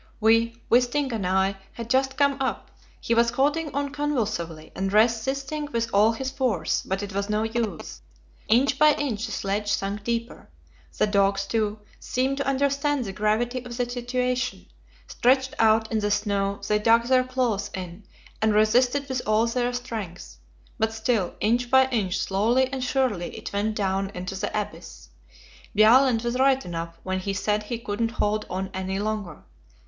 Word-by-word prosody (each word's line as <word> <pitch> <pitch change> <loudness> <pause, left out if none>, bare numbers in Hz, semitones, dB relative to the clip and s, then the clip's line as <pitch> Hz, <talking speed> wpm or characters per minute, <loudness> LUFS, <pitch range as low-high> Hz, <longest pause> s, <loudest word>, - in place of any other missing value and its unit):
We 230 +1 +3
Wisting 250 +3 +2
and 205 -5 -2
I 190 +1 +1 0.2
had 230 -1 -7
just 265 +2 +1
come 280 -1 +2
up. 265 - -3 0.3
He 235 - -1
was 235 0 +4
holding 290 +5 0
on 285 0 -1
convulsively, 215 - -3
and 195 0 -2
resisting 265 +7 +1
with 230 0 -2
all 210 +3 +5
his 265 +3 -4
force, 255 - 0
but 195 +2 -3
it 200 -1 -6
was 200 +1 -2
no 210 +1 +1
use 220 - -3 0.5
inch 265 +5 +3
by 305 0 +6
inch 240 -6 -2
the - - -7
sledge 205 +1 -2
sank 200 +1 -2
deeper. 235 +2 -4 0.5
The - - +3
dogs, 200 -1 +2
too, 210 +1 -1 0.2
seemed 265 +2 -1
to 280 -1 -2
understand 280 0 +1
the 195 - -5
gravity 225 +5 0
of 240 -1 -8
the 245 - +1
situation; 250 +1 -2 0.4
stretched 260 +1 +2
out 220 0 +3
in 220 - +1
the 205 0 0
snow, 200 -1 0
they 210 0 +2
dug 230 +2 +4
their 255 +1 +3
claws 250 -6 -1
in, 180 +1 -7 0.4
and 215 -1 +2
resisted 245 +6 +3
with 260 -2 -2
all 215 +1 +3
their 245 +1 0
strength. 225 -8 -6 0.4
But 220 0 +1
still, 220 -4 -1
inch 240 +3 +1
by 265 0 +5
inch, 200 -7 0
slowly 235 +8 +1
and 260 -1 -2
surely, 245 -9 -1
it - - -7
went 210 +2 -1
down 195 -1 -1
into 185 +2 -5
the 190 - -3
abyss. - - -8 0.7
Bjaaland 230 +2 +5
was 240 +1 -2
right 270 0 +3
enough 170 -1 -5
when 185 0 -2
he 195 +1 -3
said 210 +2 0
he 220 +3 -4
couldn't 225 0 -2
hold 210 -1 -1
on 190 +1 -3
any 190 0 -3
longer. 205 -5 -4
225 Hz, 170 wpm, -25 LUFS, 200-255 Hz, 0.7 s, by